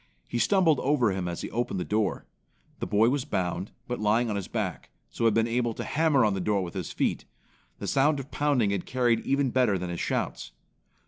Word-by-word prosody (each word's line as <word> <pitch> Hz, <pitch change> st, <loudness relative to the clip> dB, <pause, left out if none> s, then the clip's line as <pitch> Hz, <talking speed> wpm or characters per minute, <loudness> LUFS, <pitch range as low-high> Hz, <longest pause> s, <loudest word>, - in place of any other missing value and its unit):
He 120 Hz, -, -2 dB
stumbled 175 Hz, -3 st, +3 dB
over 130 Hz, -6 st, +2 dB
him 95 Hz, -2 st, -2 dB
as 85 Hz, -1 st, -4 dB
he -, -, -6 dB
opened 120 Hz, -5 st, -2 dB
the -, -, -1 dB
door. 105 Hz, 0 st, -1 dB, 0.5 s
The -, -, -3 dB
boy 105 Hz, +5 st, +4 dB
was 135 Hz, 0 st, 0 dB
bound, 95 Hz, -, -2 dB, 0.2 s
but 125 Hz, -, -3 dB
lying 110 Hz, +2 st, +2 dB
on -, -, -2 dB
his 100 Hz, -2 st, -3 dB
back, -, -, -4 dB, 0.2 s
so 115 Hz, -, -2 dB
had 110 Hz, -2 st, +4 dB
been 115 Hz, 0 st, +3 dB
able 120 Hz, -1 st, 0 dB
to -, -, -4 dB
hammer 150 Hz, -6 st, +2 dB
on 105 Hz, -, +2 dB
the 95 Hz, -, -2 dB
door 100 Hz, +1 st, 0 dB
with 85 Hz, -, -6 dB
his -, -, -4 dB
feet. -, -, -1 dB, 0.5 s
The -, -, -6 dB
sound 145 Hz, +2 st, +2 dB
of 135 Hz, +2 st, -8 dB
pounding 140 Hz, -8 st, +1 dB
had 100 Hz, -3 st, -2 dB
carried 120 Hz, -3 st, +2 dB
even 135 Hz, +1 st, 0 dB
better 125 Hz, -6 st, +2 dB
than 90 Hz, -1 st, -4 dB
his 85 Hz, -, -4 dB
shouts. -, -, -2 dB
115 Hz, 220 wpm, -27 LUFS, 100-135 Hz, 0.5 s, boy